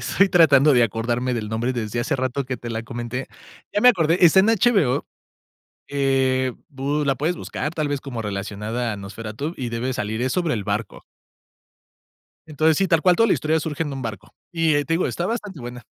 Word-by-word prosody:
Estoy 195 Hz, 0 st, +2 dB
tratando 150 Hz, -5 st, +5 dB
de 125 Hz, -3 st, +5 dB
acordarme 120 Hz, +3 st, -1 dB
del 110 Hz, -3 st, -3 dB
nombre 115 Hz, +4 st, -1 dB
desde 120 Hz, -1 st, -3 dB
hace 135 Hz, +5 st, -1 dB
rato 130 Hz, +1 st, -2 dB
que 125 Hz, 0 st, -4 dB
te 120 Hz, 0 st, -7 dB
la 115 Hz, 0 st, -3 dB
comenté. 120 Hz, +2 st, -5 dB, 0.5 s
Ya 205 Hz, -, +1 dB
me 250 Hz, -, +7 dB
acordé, 165 Hz, -6 st, +3 dB
está 175 Hz, +3 st, +7 dB
en 195 Hz, -, +3 dB
HBO, 195 Hz, -, +2 dB, 0.8 s
eh, 130 Hz, -2 st, +1 dB, 0.2 s
bu 145 Hz, +2 st, -2 dB
la 135 Hz, -1 st, +2 dB
puedes 160 Hz, +7 st, -1 dB
buscar 150 Hz, -1 st, -4 dB
tal 155 Hz, -3 st, -1 dB
vez 145 Hz, -1 st, -2 dB
como 125 Hz, -5 st, -5 dB
relacionada 105 Hz, +3 st, -3 dB
a -, -, -7 dB
Nosferatu 110 Hz, -, -6 dB
y 125 Hz, -2 st, -3 dB
debe 120 Hz, +3 st, -2 dB
salir, 110 Hz, 0 st, -3 dB
es 130 Hz, +1 st, 0 dB
sobre 175 Hz, -5 st, 0 dB
el 105 Hz, -3 st, -3 dB
barco. 105 Hz, +1 st, -4 dB, 1.4 s
Entonces, 155 Hz, 0 st, +2 dB
si, 195 Hz, -, +1 dB
tal 165 Hz, -2 st, +3 dB
cual, 180 Hz, -1 st, +5 dB
toda 230 Hz, +3 st, +4 dB
la -, -, +4 dB
historia 155 Hz, +1 st, 0 dB
surge 155 Hz, 0 st, -3 dB
en 145 Hz, -, -5 dB
un 135 Hz, -, -5 dB
barco. 105 Hz, -4 st, -7 dB, 0.2 s
Y, 165 Hz, -2 st, +1 dB
eh, 145 Hz, 0 st, +1 dB
te 165 Hz, -, 0 dB
digo, 170 Hz, -, +1 dB
está 175 Hz, -, -2 dB
bastante 210 Hz, -, -4 dB
buena. 120 Hz, 0 st, -8 dB
135 Hz, 205 wpm, -22 LUFS, 115-160 Hz, 1.4 s, me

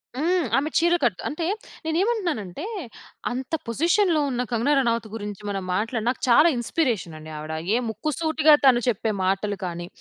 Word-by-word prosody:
హ్మ్. 345 Hz, +5 st, +1 dB
ఆమె 295 Hz, +3 st, 0 dB
చీర 345 Hz, +1 st, +4 dB
కట్ 215 Hz, -7 st, +1 dB
అంటే, 325 Hz, +3 st, -3 dB, 0.4 s
నేనేమంటున్నాను 350 Hz, -, 0 dB
అంటే, 235 Hz, -, -7 dB, 0.7 s
అంత 260 Hz, +4 st, -5 dB
పొజిషన్‌లో 335 Hz, -, +2 dB
ఉన్న 250 Hz, -1 st, -1 dB
కంగనా 240 Hz, +6 st, +2 dB
రనౌత్ 230 Hz, -3 st, 0 dB
గురించి 205 Hz, -2 st, -6 dB
మనం 195 Hz, -2 st, -3 dB
మాట్లాడిన 225 Hz, +3 st, -1 dB
నాకు 255 Hz, -, -3 dB
చాలా 300 Hz, +8 st, +7 dB
ఇన్స్పిరేషన్ 235 Hz, -, -1 dB
అండి 155 Hz, 0 st, -10 dB
ఆవిడ. 155 Hz, +1 st, -6 dB, 0.2 s
ఏ -, -, +4 dB
ముక్కు 305 Hz, +8 st, -3 dB
సూటిగా 315 Hz, -1 st, +4 dB
తను 245 Hz, -2 st, +6 dB
చెప్పే 220 Hz, -1 st, +1 dB
మాటలు 195 Hz, +1 st, 0 dB
కానీ, 175 Hz, 0 st, -5 dB
245 Hz, 160 wpm, -24 LUFS, 210-315 Hz, 0.7 s, చాలా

